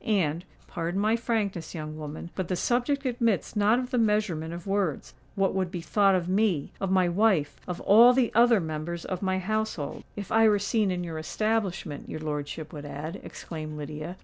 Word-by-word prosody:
And—pardon 175 -1 -2
my 215 +2 +3
frankness, 210 -9 -2
young 155 -1 -5
woman; 155 +2 -7
but 185 -3 -3
the 185 - -1
subject 255 +8 0
admits 230 -7 0
not 210 +3 +4
of 250 0 -3
the 250 - +2
measurement 210 -8 +1
of 170 0 -7
words—what 195 0 -2
would 185 -2 0
be 175 -1 -5
thought 195 +2 +3
of 175 -2 -1
me—of 190 -2 0
my 185 -1 +3
wife—of 180 -3 +1
all 230 +5 +8
the 250 -2 +2
other 235 -1 +5
members 160 +1 -4
of 185 -1 -4
my 190 -1 0
household——" 215 -5 -2
"If 200 -3 -6
I 225 0 +6
were 210 - +4
seen 205 +1 +1
in 180 -1 -2
your 165 -2 -5
establishment, 195 -4 -2
your - - -5
lordship 150 0 -4
would 145 -2 -7
add," 145 +3 -6
exclaimed 155 -2 -7
Lydia. 155 +4 -6
185 Hz, 175 wpm, -27 LUFS, 160-215 Hz, -, all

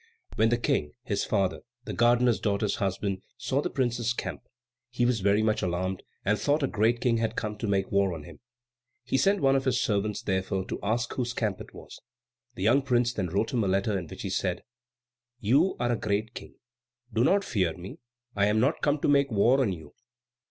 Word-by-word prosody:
When 110 +1 +3
the 120 - +2
King, 75 -10 -1
his - - -1
father, 95 -2 0 0.3
the - - -5
gardener's 120 -2 +3
daughter's 100 +1 0
husband, 95 0 -2 0.2
saw 135 +1 0
the - - -2
prince's 120 -3 0
camp, - - -5 0.5
he 120 0 0
was 120 -2 +2
very 100 +2 +2
much 110 -1 +1
alarmed, 95 +1 -2 0.2
and 105 +2 +2
thought 145 +1 +1
a - - +2
great 115 +2 +1
King 120 -3 +2
had 115 0 -1
come 105 0 -3
to 115 - -2
make 95 -1 0
war 100 -1 +2
on 75 - -8
him. - - -13 0.6
He - - -2
sent 195 +7 +3
one 135 -1 +4
of 135 -1 0
his 130 - +2
servants, 105 0 -1
therefore, 95 -1 -1
to - - -3
ask 115 +3 -1
whose 120 -2 -2
camp 105 -5 -1
it - - -12
was. - - -12 0.5
The 95 - -5
young 125 +7 +4
prince 125 -2 +1
then 100 -6 -2
wrote 100 - -1
him 120 -3 +1
a - - 0
letter, 100 +2 +1
in 90 -4 -3
which - - -9
he 95 - -3
said, 90 -1 -1 0.8
"You 140 - +3
are 120 0 +1
a - - +2
great 110 0 -2
King. - - -10 0.6
Do 115 +2 +2
not 200 +9 +3
fear 95 - -1
me. 90 +2 -9 0.4
I 100 0 +3
am 105 +1 +2
not 135 +7 +1
come 145 0 +1
to - - +1
make 140 -1 +4
war 120 +5 +3
on 115 -7 +1
you. 80 -5 -9
110 Hz, 215 wpm, -28 LUFS, 95-125 Hz, 0.8 s, one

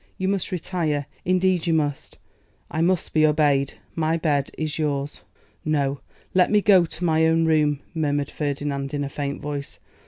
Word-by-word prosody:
You 190 - -1
must 195 -2 -1
retire; 165 -5 -1 0.2
indeed 185 -1 +2
you 165 - +3
must. 145 -3 -2 0.5
I 160 - -1
must 180 0 +1
be 155 - +4
obeyed. 145 -3 +3 0.2
My 160 0 0
bed 145 -4 0
is 155 -1 -3
yours.' 145 -2 -2 0.4
'No! 140 -2 0 0.3
let 185 -1 +4
me 210 - +4
go 190 -4 +5
to 175 +2 -4
my 160 -1 +3
own 165 0 +3
room,' 150 -3 +2
murmured 145 -3 -1
Ferdinand, 145 -1 -3
in 145 - -1
a 140 - -3
faint 140 0 -4
voice. 145 -1 -5
155 Hz, 165 wpm, -24 LUFS, 145-165 Hz, 0.5 s, go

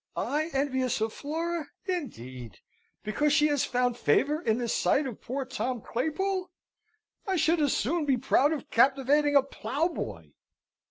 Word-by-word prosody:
I 310 +3 -1
envious 260 -3 0
of 220 0 -1
Flora, 325 +1 -3 0.2
indeed, 130 - -5 0.5
because 290 +8 +1
she 300 0 +4
has 290 -3 +1
found 245 -1 0
favour 290 - +2
in 220 -8 +1
the 240 -1 -2
sight 275 +5 +2
of 245 -5 -6
poor 265 +3 -3
Tom 255 -1 -3
Claypool! 365 - -2 0.8
I 385 - +1
should 330 -1 +2
as 290 - +2
soon 310 +7 0
be 265 -2 +3
proud 270 +3 +3
of 310 -4 -4
captivating 280 +4 +3
a 280 - +7
ploughboy!" 275 - -3
275 Hz, 150 wpm, -28 LUFS, 245-310 Hz, 0.8 s, a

